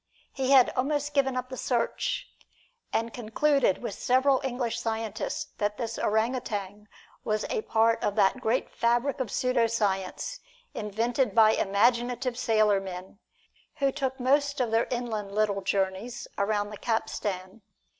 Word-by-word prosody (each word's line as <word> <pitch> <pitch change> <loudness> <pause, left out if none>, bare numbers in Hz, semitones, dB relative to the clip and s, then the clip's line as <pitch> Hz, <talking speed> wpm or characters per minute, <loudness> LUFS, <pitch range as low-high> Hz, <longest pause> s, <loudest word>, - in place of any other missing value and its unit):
He 265 -1 -1
had 265 -3 +6
almost 290 +2 -1
given 270 -2 +2
up 255 0 -3
the 260 - -6
search, 275 - -1 0.6
and 230 0 -1
concluded 245 0 +1
with 225 - -3
several 260 +4 +2
English 245 -3 -2
scientists 220 -2 -3
that 205 0 -1
this 230 -2 -4
orang 220 +4 +1
utan 210 -4 -5 0.4
was 215 -1 -1
a - - 0
part 225 +1 +2
of 205 - 0
that 210 +4 +3
great 235 +2 0
fabric 240 +4 +1
of 255 -5 -2
pseudo 250 -1 +1
science 205 - -2 0.3
invented 225 +2 -1
by 220 -1 +7
imaginative 240 +5 +1
sailormen, 200 -5 0 0.6
who 275 -2 +1
took 265 -1 -3
most 285 +2 +2
of 240 -3 0
their 225 +1 +2
inland 220 -5 -3
little 210 -2 +1
journeys 195 +4 -2
around 205 0 0
the 210 - -7
capstan. 210 -3 -3
230 Hz, 140 wpm, -28 LUFS, 210-255 Hz, 0.6 s, by